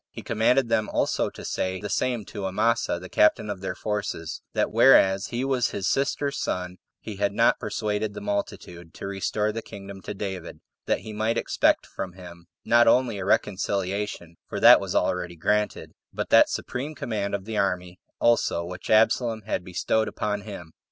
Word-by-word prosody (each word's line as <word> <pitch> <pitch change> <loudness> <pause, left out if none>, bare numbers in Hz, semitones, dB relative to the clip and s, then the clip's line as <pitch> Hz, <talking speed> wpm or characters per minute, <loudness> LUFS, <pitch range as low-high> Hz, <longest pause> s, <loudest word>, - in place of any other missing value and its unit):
He - - -10
commanded 120 +3 +2
them 110 -2 +1
also - - 0
to - - -11
say 95 0 -2
the - - -5
same 120 -5 -1
to 100 0 -5
Amasa 110 +1 +1
the 90 - -9
captain 105 +2 +3
of 95 -2 -6
their 95 - -4
forces, 100 -6 -4
That - - 0
whereas 95 +1 +5
he 120 +3 -2
was 130 -4 +1
his 95 - -3
sister's 140 +1 0
son, 90 0 -3 0.2
he 105 -3 -8
had 100 0 0
not 115 +3 +3
persuaded 105 -2 -2
the - - -5
multitude 145 - -5
to - - -7
restore 100 +2 -1
the 115 +1 -5
kingdom 100 -2 -10
to 100 - -6
David; 95 -3 -6 0.3
that - - +1
he 110 - -8
might 110 +2 0
expect - - +2
from 90 - -6
him 85 -2 -12 0.2
not 120 +1 +5
only 120 -3 +3
a 95 - -4
reconciliation, 100 -3 -1
for - - -3
that - - +9
was - - -4
already 90 -1 0
granted, 105 +6 -1 0.2
but - - -4
that - - +7
supreme 145 +5 -4
command 105 -6 -2
of 95 -1 -6
the 110 -1 -4
army 90 -2 -1 0.2
also 115 -7 +2
which 90 +1 -8
Absalom 110 0 +3
had 105 -3 -2
bestowed 95 +4 0
upon 105 -1 -2
him. 100 -6 -9
105 Hz, 180 wpm, -25 LUFS, 95-115 Hz, 0.3 s, that